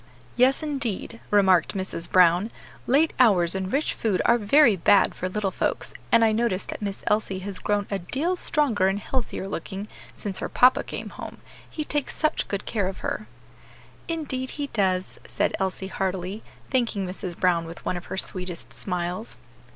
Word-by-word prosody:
"Yes, 260 +5 +4
indeed," 240 -6 -2
remarked 190 -5 +4
Mrs. 185 -3 -3
Brown, 180 +3 +5 0.4
"late 295 +5 +3
hours 185 -9 +5
and 190 0 -2
rich 285 +3 +1
food 210 -5 0
are 235 0 +5
very 230 +2 +5
bad 190 +2 +4
for 185 - -3
little 200 0 -1
folks, - - -2 0.2
and 230 -1 +6
I 220 - +4
notice 215 -4 0
that - - -7
Miss 200 -2 -4
Elsie 210 -2 +1
has 195 -1 -5
grown 205 -1 0
a 200 - 0
deal 290 - -1
stronger 270 - +1
and 195 +1 +1
healthier 230 -2 -3
looking 195 +1 -5 0.3
since 195 -3 -2
her - - -3
papa 250 +1 +5
came - - -6
home; - - -8 0.3
he 310 - -4
takes 295 -2 -2
such 310 - 0
good 200 -1 -3
care 205 -5 0
of 190 - -6
her." 215 - -3 0.8
"Indeed 285 -6 -2
he 285 -1 -3
does," 185 -3 0
said - - 0
Elsie 190 0 -2
heartily, 190 +1 -3 0.3
thanking 230 -6 +1
Mrs. 180 -1 -5
Brown 175 -2 +2
with 165 +1 -10
one - - 0
of 175 - -6
her - - -5
sweetest 180 -2 -3
smiles. 180 +3 -4
200 Hz, 175 wpm, -25 LUFS, 185-240 Hz, 0.8 s, and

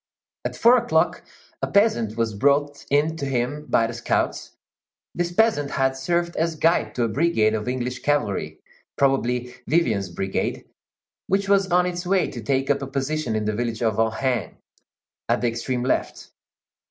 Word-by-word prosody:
At - - -3
four 240 +2 +6
o'clock, 240 0 +1 0.4
a - - 0
peasant 120 - +2
was 115 -2 0
brought 145 +6 +1
in 150 +3 +2
to 140 - -3
him 135 +4 -2
by 115 - +3
the 115 - -4
scouts; 120 0 -2 0.6
this 175 0 -2
peasant 175 -8 +2
had 135 -1 0
served 170 +5 -1
as 165 0 0
guide 155 -9 +1
to 120 - +1
a - - +2
brigade 110 -3 +2
of 110 +1 -3
English 125 0 -2
cavalry, 145 -9 -1 0.4
probably 125 -3 +1
Vivian's 115 - +1
brigade, 95 +2 -3 0.6
which 195 +1 +1
was 195 -1 +3
on 180 0 +4
its 175 -1 -3
way 190 +1 +2
to 120 - -7
take 135 +4 0
up 140 - 0
a 135 - -4
position 135 -2 -2
in 110 -1 -1
the 105 - 0
village 115 +1 -2
of 110 -1 0
Ohain, 115 - 0 0.7
at - - +2
the 120 - +2
extreme 120 +2 -2
left. 130 - -2
135 Hz, 165 wpm, -23 LUFS, 115-165 Hz, 0.7 s, four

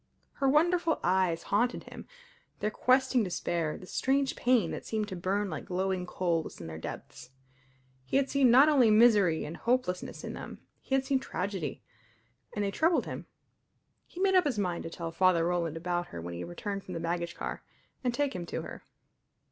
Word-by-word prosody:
Her 275 -1 +1
wonderful 330 +3 +3
eyes 185 -3 +2
haunted 240 +4 0
him - - -11 0.5
their 210 - -1
questing 255 +1 +3
despair, 170 -4 -2
the - - -11
strange 270 +7 0
pain 240 -8 +2
that - - -5
seemed 215 -2 -2
to 190 - -5
burn 195 +3 -1
like 155 -6 -5
glowing 185 0 -1
coals 170 -3 -2
in 85 - -8
their 80 -1 -7
depths. 125 - -8 0.7
He 130 - 0
had 275 -1 +2
seen 275 -3 +4
not 260 +5 +7
only 270 -7 +5
misery 210 -7 +5
and 160 - -6
hopelessness 235 -7 -1
in - - -5
them; - - -8 0.2
he 270 - -1
had 270 0 +1
seen 270 -1 +2
tragedy; 190 - -4 0.7
and 205 -1 -1
they 200 - -1
troubled 325 - +2
him. - - -7 0.8
He 355 - -11
made 385 0 +3
up 365 -3 +5
his 255 -6 -1
mind 180 -4 -1
to - - -4
tell 165 0 -5
Father 180 -1 +3
Roland 170 -2 -1
about 175 +1 -2
her 85 - -8
when 85 +1 -6
he 85 +1 -5
returned 195 - -5
from 180 - -7
the - - -3
baggage 170 +1 -2
car, - - -5 0.4
and 250 - +1
take 280 +2 -1
him 175 -1 -5
to - - -4
her. - - -8
195 Hz, 190 wpm, -30 LUFS, 170-260 Hz, 0.8 s, not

